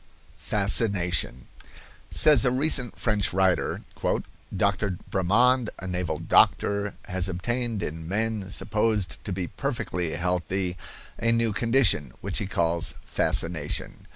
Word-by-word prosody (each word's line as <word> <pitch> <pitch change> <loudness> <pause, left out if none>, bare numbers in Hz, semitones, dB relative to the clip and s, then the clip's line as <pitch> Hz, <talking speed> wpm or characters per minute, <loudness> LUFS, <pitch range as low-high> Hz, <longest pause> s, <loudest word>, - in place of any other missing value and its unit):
FASCINATION. 95 - +1 0.6
Says 150 -7 +5
a - - +4
recent 130 -1 0
French 105 -3 +1
writer: 95 -1 +1 0.8
"Dr. 100 -1 0
Bremand, 115 +6 +3
a - - -9
naval 90 -4 -2
doctor, 100 +5 +2
has 95 0 -2
obtained 115 +4 -2
in 80 +1 -5
men 105 -1 -2
supposed 105 -2 0
to 100 - -4
be 95 -1 -2
perfectly 90 - -3
healthy 90 +1 -1 0.4
a 115 0 +1
new 115 -2 +1
condition, 115 - +4
which - - -3
he 100 - -3
calls 85 -2 +1
fascination. 80 -4 -1
100 Hz, 115 wpm, -25 LUFS, 90-115 Hz, 0.8 s, Says